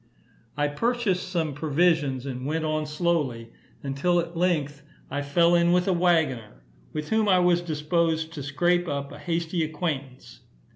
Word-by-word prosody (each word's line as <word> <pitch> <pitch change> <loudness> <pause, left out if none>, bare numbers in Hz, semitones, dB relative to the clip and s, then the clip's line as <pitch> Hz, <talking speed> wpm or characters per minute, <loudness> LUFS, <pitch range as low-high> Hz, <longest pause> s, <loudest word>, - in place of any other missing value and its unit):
I 145 0 +2
purchased 200 +2 -1
some 165 -5 -1
provisions, 145 -3 +1
and 130 -2 -5
went 160 +1 -1
on 155 0 -1
slowly, 150 -8 -1 0.3
until 140 +6 +1
at 170 0 -4
length 155 -5 0 0.3
I 145 +1 -1
fell 170 +5 +3
in 170 0 +4
with 180 +1 +2
a 190 - +3
waggoner, 160 - 0 0.3
with 150 0 -5
whom 220 -1 +2
I 185 - +5
was 175 -1 +3
disposed 160 0 -1
to 150 - -6
scrape 175 +5 +1
up 140 -2 -3
a - - -10
hasty 170 0 -1
acquaintance. 140 - -5
160 Hz, 155 wpm, -26 LUFS, 145-175 Hz, 0.3 s, I